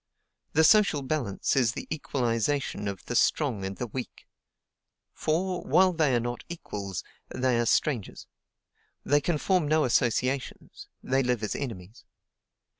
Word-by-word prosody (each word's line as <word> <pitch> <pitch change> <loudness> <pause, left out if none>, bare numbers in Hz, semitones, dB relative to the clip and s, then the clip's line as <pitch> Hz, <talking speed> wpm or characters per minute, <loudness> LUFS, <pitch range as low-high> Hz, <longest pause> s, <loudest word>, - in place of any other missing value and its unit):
The 160 - +4
social 165 -5 +5
balance 130 -8 -1
is 120 -5 +3
the - - -7
equalization 125 -5 -1
of 100 -2 -5
the 120 - -4
strong 120 -6 +2
and 95 0 -4
the 125 - -3
weak; 120 +2 -7 0.9
for, 180 +3 -1
while 185 0 +4
they 155 -6 +2
are - - +3
not 120 +1 -4
equals, 100 - -5 0.3
they 125 -2 0
are 120 - +1
strangers; 120 -7 0 0.8
they 145 0 +3
can 170 +1 0
form 180 0 +1
no 155 +1 +3
associations, 125 +2 -1 0.2
they 135 +1 +1
live 125 -3 0
as 105 - -1
enemies. 110 -6 -7
130 Hz, 140 wpm, -27 LUFS, 115-155 Hz, 0.9 s, social